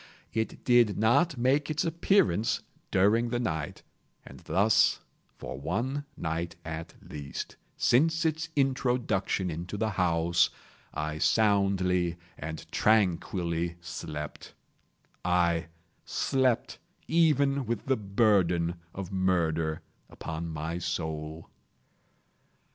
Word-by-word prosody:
It 110 0 -3
did 120 -4 +4
not 125 +8 +3
make 135 +5 +2
its 155 0 0
appearance 165 - +2 0.3
during 105 +5 +3
the 120 - -1
night; 80 -11 -3 0.4
and - - -12
thus 105 +3 +3 0.4
for - - -7
one 120 - -2
night 85 +1 -3
at 80 0 -6
least, 70 -3 -6 0.2
since 160 +6 +3
its 160 +1 0
introduction 125 -9 +1
into 85 +6 -5
the 110 +1 0
house, 85 -2 +2 0.4
I 75 +1 -3
soundly 95 -5 +2 0.2
and 80 +1 -6
tranquilly 85 -5 +1
slept; 80 -3 -7 0.7
aye, 85 -2 +2 0.4
slept 130 -3 0 0.3
even 140 -5 +3
with 115 -2 -2
the 135 - +2
burden 95 -5 +2 0.2
of 95 -1 -5
murder 85 -4 0 0.3
upon 80 +1 -5
my 80 +2 -4
soul! 80 -2 -4
95 Hz, 100 wpm, -29 LUFS, 85-120 Hz, 0.7 s, did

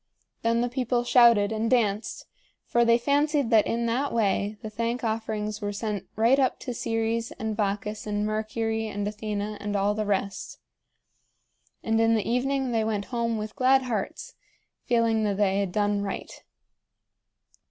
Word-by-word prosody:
Then 230 +1 +2
the 245 - +1
people 245 -1 -1
shouted 235 -4 +5
and 220 +1 -1
danced, 220 -4 0 0.4
for 235 - +2
they 235 0 +5
fancied 285 +1 +1
that 220 -2 +5
in 235 0 -1
that 255 +5 0
way 210 -1 0
the 215 - -4
thank 230 +3 -2
offerings 220 -1 -2
were 205 0 -2
sent 205 -2 -4
right 235 +5 +4
up 260 -2 +2
to 250 - -4
Ceres 225 0 -1
and 220 -1 -4
Bacchus 210 +1 -2
and 210 0 -1
Mercury 220 +1 -2
and 205 -1 -3
Athena 210 0 -4
and 205 0 -3
all 200 +1 +2
the 215 0 -2
rest. 200 -1 -2 1.3
And 225 0 +1
in 225 0 +4
the 215 - -1
evening 265 +2 0
they 225 -2 +1
went 210 -2 -2
home 230 -1 0
with 215 0 -5
glad 265 +1 +4
hearts, 225 -6 -4 0.5
feeling 230 -2 +2
that 200 -2 0
they 200 -1 +2
had 195 -3 -1
done 205 0 +1
right. 195 -1 -4
220 Hz, 165 wpm, -26 LUFS, 210-235 Hz, 1.3 s, shouted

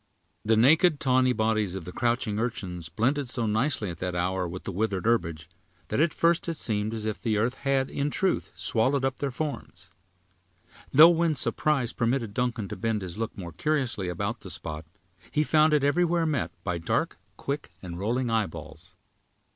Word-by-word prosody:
The 110 +1 +3
naked, 155 - +5
tawny 130 -1 +3
bodies 110 -4 0
of 95 -4 -6
the 90 - -6
crouching 120 -1 0
urchins 95 -8 -4
blended 135 +3 0
so 120 -1 0
nicely 110 -2 +1
at 85 - -10
that 90 -1 -3
hour, 90 +1 0
with 90 +2 -7
the - - -4
withered 100 0 -1
herbage, 85 -9 0 0.4
that - - 0
at 160 +1 +3
first 170 +1 +2
it 165 - -3
seemed 105 -1 -1
as 110 -1 -4
if 110 -1 -3
the 110 -3 0
earth 115 +4 +1
had, 135 0 0
in 140 +1 -2
truth, 190 +5 0
swallowed 130 +4 +1
up 135 -1 -1
their 140 - -2
forms; 145 +3 -6 1.0
though 155 +5 +9
when 165 -2 +2
surprise 135 -1 0
permitted 115 -3 0
Duncan 120 -3 -1
to - - -4
bend 110 -3 -1
his 90 +3 -6
look 115 - -3
more 85 -3 -6
curiously 120 - -1
about 100 +6 -3
the 95 - -10
spot, 80 -2 -6 0.4
he 150 - +1
found 155 0 +4
it 150 -2 +3
everywhere 170 +3 +2
met 140 - 0
by 90 -3 -2
dark, 85 - -1 0.2
quick, 140 +1 -4
and 85 -1 -6
rolling 120 +4 0
eyeballs. 85 -4 -4
115 Hz, 180 wpm, -27 LUFS, 95-140 Hz, 1.0 s, though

